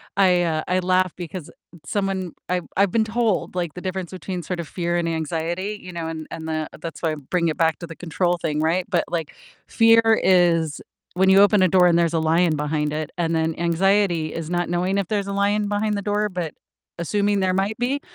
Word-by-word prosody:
I, 180 Hz, -3 st, +4 dB
uh 160 Hz, -2 st, -1 dB
I 185 Hz, 0 st, +1 dB
laugh 185 Hz, 0 st, +2 dB
because 175 Hz, -2 st, -7 dB, 0.3 s
someone 195 Hz, -4 st, -2 dB, 0.2 s
I've, 180 Hz, -1 st, 0 dB
I've 200 Hz, -2 st, +3 dB
been 225 Hz, +1 st, +2 dB
told, 220 Hz, -4 st, -1 dB
like, 175 Hz, -4 st, -2 dB
the 180 Hz, -, -8 dB
difference 185 Hz, -2 st, -4 dB
between 185 Hz, 0 st, -5 dB
sort 180 Hz, +2 st, -4 dB
of 165 Hz, -, -9 dB
fear 175 Hz, -1 st, -2 dB
and 170 Hz, -1 st, 0 dB
anxiety, 165 Hz, +5 st, -3 dB
you 185 Hz, -, -8 dB
know, 170 Hz, -2 st, -4 dB
and 160 Hz, -1 st, -6 dB
and 160 Hz, -1 st, -6 dB
the 155 Hz, -1 st, -2 dB
that's 165 Hz, -, -7 dB
why 165 Hz, -2 st, +1 dB
I -, -, -3 dB
bring 165 Hz, +4 st, -1 dB
it 155 Hz, -, -3 dB
back 165 Hz, -2 st, +1 dB
to 170 Hz, -, -7 dB
the 165 Hz, -, -9 dB
control 175 Hz, +1 st, -1 dB
thing, 155 Hz, -2 st, -2 dB
right? 175 Hz, +3 st, +1 dB
But, -, -, +2 dB
like, 165 Hz, -3 st, -3 dB, 0.3 s
fear 230 Hz, 0 st, +5 dB, 0.2 s
is 170 Hz, -4 st, +3 dB, 0.3 s
when 190 Hz, +1 st, +3 dB
you 190 Hz, +1 st, +7 dB
open 205 Hz, -1 st, +5 dB
a 185 Hz, -, +5 dB
door 180 Hz, 0 st, +5 dB
and 170 Hz, 0 st, +4 dB
there's 170 Hz, -1 st, +1 dB
a 165 Hz, -, +2 dB
lion 160 Hz, +1 st, +2 dB
behind 150 Hz, 0 st, -1 dB
it, 155 Hz, -1 st, -3 dB
and 165 Hz, -1 st, 0 dB
then 160 Hz, 0 st, 0 dB
anxiety 175 Hz, -1 st, +1 dB
is 165 Hz, -1 st, -5 dB
not 175 Hz, -1 st, -1 dB
knowing 180 Hz, +3 st, 0 dB
if 200 Hz, -3 st, -1 dB
there's 200 Hz, -2 st, -1 dB
a 200 Hz, -, -3 dB
lion 205 Hz, +1 st, +1 dB
behind 210 Hz, 0 st, 0 dB
the -, -, -3 dB
door, 210 Hz, +1 st, +1 dB
but 175 Hz, -4 st, -4 dB, 0.5 s
assuming 205 Hz, +3 st, +1 dB
there 185 Hz, -1 st, +1 dB
might 195 Hz, +3 st, -1 dB
be, 260 Hz, +4 st, 0 dB
175 Hz, 225 wpm, -22 LUFS, 165-195 Hz, 0.5 s, you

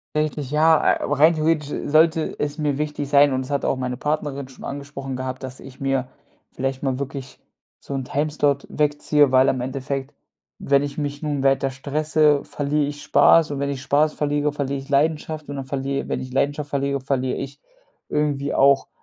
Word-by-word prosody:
Eigentlich, 150 Hz, -3 st, -1 dB
ja. 155 Hz, +1 st, +4 dB
Äh, -, -, -16 dB
aber 145 Hz, -, -1 dB
rein 155 Hz, +4 st, +6 dB
theoretisch 155 Hz, -2 st, 0 dB, 0.2 s
sollte 160 Hz, +1 st, +3 dB
es 145 Hz, +1 st, -3 dB
mir 145 Hz, -2 st, 0 dB
wichtig 150 Hz, -1 st, -3 dB
sein 145 Hz, -1 st, +5 dB
und 130 Hz, -, 0 dB
das 130 Hz, -, -8 dB
hat 140 Hz, -1 st, -1 dB
auch -, -, +1 dB
meine 125 Hz, -1 st, -3 dB
Partnerin 145 Hz, -1 st, -2 dB
schon 130 Hz, -, -14 dB
angesprochen 140 Hz, -1 st, -6 dB
gehabt, 130 Hz, 0 st, -5 dB
dass 130 Hz, -1 st, -7 dB
ich 130 Hz, -1 st, -12 dB
mir 135 Hz, -2 st, 0 dB, 0.4 s
vielleicht 135 Hz, +1 st, -3 dB
mal 135 Hz, -1 st, -1 dB
wirklich 135 Hz, -1 st, -6 dB, 0.4 s
so 140 Hz, -, -6 dB
'n 135 Hz, -, -2 dB
Timeslot 145 Hz, 0 st, 0 dB
wegziehe, 150 Hz, -1 st, +2 dB
weil 130 Hz, +1 st, +5 dB
am 130 Hz, -, 0 dB
Endeffekt, 135 Hz, +2 st, -4 dB, 0.5 s
wenn 140 Hz, 0 st, +2 dB
ich 145 Hz, +1 st, -5 dB
mich 145 Hz, 0 st, -4 dB
nun 145 Hz, -2 st, -1 dB
weiter 135 Hz, 0 st, +2 dB
stresse, 150 Hz, +2 st, +1 dB
verliere 145 Hz, +1 st, -1 dB
ich 145 Hz, 0 st, -6 dB
Spaß 150 Hz, +2 st, +5 dB
und 140 Hz, -, -3 dB
wenn 140 Hz, 0 st, -1 dB
ich 135 Hz, -2 st, -5 dB
Spaß 150 Hz, +2 st, +2 dB
verliere, 145 Hz, 0 st, 0 dB
verliere 140 Hz, -1 st, -2 dB
ich 135 Hz, -, -13 dB
Leidenschaft 155 Hz, +1 st, 0 dB
und 145 Hz, -, -4 dB
dann 135 Hz, -1 st, -5 dB
verliere 135 Hz, +1 st, -3 dB
wenn -, -, -2 dB
ich 130 Hz, -, -7 dB
Leidenschaft 145 Hz, +2 st, -1 dB
verliere, 140 Hz, -1 st, -1 dB
verliere 130 Hz, -1 st, -1 dB
ich 140 Hz, +1 st, -7 dB, 0.5 s
irgendwie 145 Hz, -2 st, -1 dB
auch 140 Hz, 0 st, +4 dB
140 Hz, 190 wpm, -22 LUFS, 135-150 Hz, 0.5 s, rein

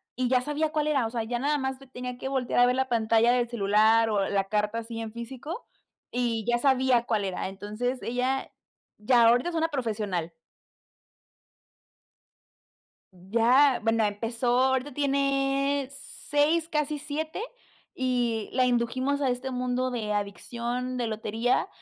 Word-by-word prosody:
y 255 Hz, -1 st, 0 dB
ya 255 Hz, -1 st, +3 dB
sabía 295 Hz, +3 st, -1 dB
cuál 305 Hz, -1 st, 0 dB
era. 275 Hz, -6 st, +2 dB
O -, -, -6 dB
sea, 230 Hz, -1 st, -2 dB
ya 240 Hz, +1 st, -3 dB
nada 295 Hz, +2 st, +1 dB
más 265 Hz, -1 st, -2 dB, 0.2 s
tenía 250 Hz, 0 st, -5 dB
que 265 Hz, -, -5 dB
voltear 260 Hz, -3 st, 0 dB
a -, -, +7 dB
ver 250 Hz, +1 st, +2 dB
la 265 Hz, 0 st, 0 dB
pantalla 230 Hz, 0 st, +3 dB
del 240 Hz, -1 st, +1 dB
celular, 220 Hz, +1 st, +3 dB
o 200 Hz, -2 st, 0 dB
la 195 Hz, -1 st, +1 dB
carta 210 Hz, +2 st, -1 dB
así 230 Hz, 0 st, -7 dB
en 220 Hz, -1 st, -5 dB
físico, 260 Hz, -, -7 dB, 0.4 s
y 235 Hz, -3 st, -1 dB
ya 240 Hz, -, +3 dB
sabía 260 Hz, -2 st, +3 dB
cuál 215 Hz, -4 st, 0 dB
era. 190 Hz, 0 st, -3 dB
Entonces, 215 Hz, +6 st, -4 dB
ella 255 Hz, +3 st, -1 dB, 0.5 s
ya 235 Hz, +3 st, +4 dB
ahorita 245 Hz, +8 st, +3 dB
es 335 Hz, -, -6 dB
una 325 Hz, 0 st, +2 dB
profesional. 210 Hz, -, -2 dB, 2.8 s
Ya, 235 Hz, +9 st, +3 dB
bueno, 225 Hz, -1 st, +2 dB
empezó, 230 Hz, +4 st, -2 dB
ahorita 265 Hz, +1 st, +1 dB
tiene 275 Hz, 0 st, +1 dB
6, 295 Hz, +4 st, -1 dB
casi 300 Hz, -1 st, -1 dB
7, 310 Hz, +5 st, -4 dB, 0.5 s
y 245 Hz, -4 st, -1 dB
la 255 Hz, 0 st, +3 dB
indujimos 255 Hz, +3 st, 0 dB
a 270 Hz, -2 st, +1 dB
este 250 Hz, +2 st, -3 dB
mundo 250 Hz, 0 st, -1 dB
de 215 Hz, -3 st, -2 dB
adicción, 240 Hz, +5 st, -3 dB
de 240 Hz, -2 st, -1 dB
lotería. 220 Hz, +2 st, 0 dB
245 Hz, 150 wpm, -27 LUFS, 225-270 Hz, 2.8 s, a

